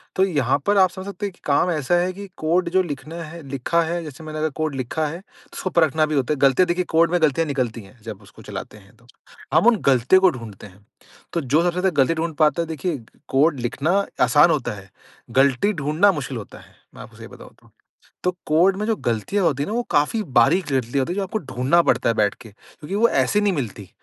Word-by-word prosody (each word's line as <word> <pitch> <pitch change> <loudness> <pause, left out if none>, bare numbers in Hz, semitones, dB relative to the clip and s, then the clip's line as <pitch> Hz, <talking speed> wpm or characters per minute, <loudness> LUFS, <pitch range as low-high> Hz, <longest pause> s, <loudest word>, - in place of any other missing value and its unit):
तो 190 - +3
यहाँ 140 -8 +1
पर 205 0 +2
आप 185 -1 +5
समझ 190 +1 -9
सकते 200 0 -5
हैं 200 - -5
कि - - -26
काम 150 +5 +2
ऐसा 155 +1 0
है 175 +1 +1
कि 200 +1 -9
कोड 170 +3 0
जो 185 +2 +3
लिखना 150 0 -7
है 165 +2 -9
लिखा 140 +5 0
है 170 +1 -3
जैसे 150 0 -10
मैंने 155 0 -6
अगर 155 0 0
कोड 155 -3 -1
लिखा 135 +5 -2
है 170 +5 -7 0.3
उसको 185 - -4
परखना 160 -3 +2
भी 155 -1 -3
होता 135 +2 +1
है। 150 - -4
गलतियाँ 140 +6 +4
देखिए 180 +1 0
कोड 165 +1 +4
में 175 -2 +1
गलतियाँ 155 +1 +2
निकलती 125 -5 -2
हैं 100 +4 -18
जब 110 -3 -8
उसको 100 - -17
चलाते 105 - -8
हैं 100 0 -20
तो। 115 - -25 0.5
हम - - +4
उन 240 - +6
गलतियों 130 +8 +4
को 190 - +6
ढूँढ़ते 115 - -9
हैं। 100 +2 -21 0.5
तो 170 - 0
जो 145 +3 +2
सबसे 175 - +2
ज़्यादा 180 +2 +1
गलती 150 - 0
ढूँढ़ 165 +1 -2
पाता 155 +2 +3
देखिए 160 +1 -3 0.3
कोड 140 +1 +2
लिखना 160 +11 0 0.2
आसान 155 +3 +5
होता 140 -8 -1
है, 100 -1 -13 0.4
गलती 135 +9 +2
ढूँढ़ना 155 +5 +2
मुश्किल 135 -7 -5
होता 105 - -10
है। - - -19 0.2
मैं - - -10
आपको - - -13
सही - - -10
बताऊँ - - -14
तो। - - -24 0.5
तो 180 - +3 0.2
कोड 175 +5 +3
में 210 +2 -3
जो 225 - +1
गलतियाँ 120 - -1
होती 140 -4 +1
हैं - - -3
ना 215 - -3
वो 240 - 0
काफ़ी 150 +10 +1 0.2
बारीक 170 +10 +3
गलतियाँ 130 +1 0
होती 170 - -3
हैं - - -5
जो 200 - -1
आपको 195 +3 -3
ढूँढ़ना 140 - +1
पड़ता 115 - +2
बैठ 105 -3 +1
के 115 - -12
क्योंकि 150 - -11
वो 225 +3 +4
ऐसे 210 - +1
नहीं 205 -2 +1
मिलती। 110 - -5
155 Hz, 235 wpm, -22 LUFS, 130-180 Hz, 0.5 s, उन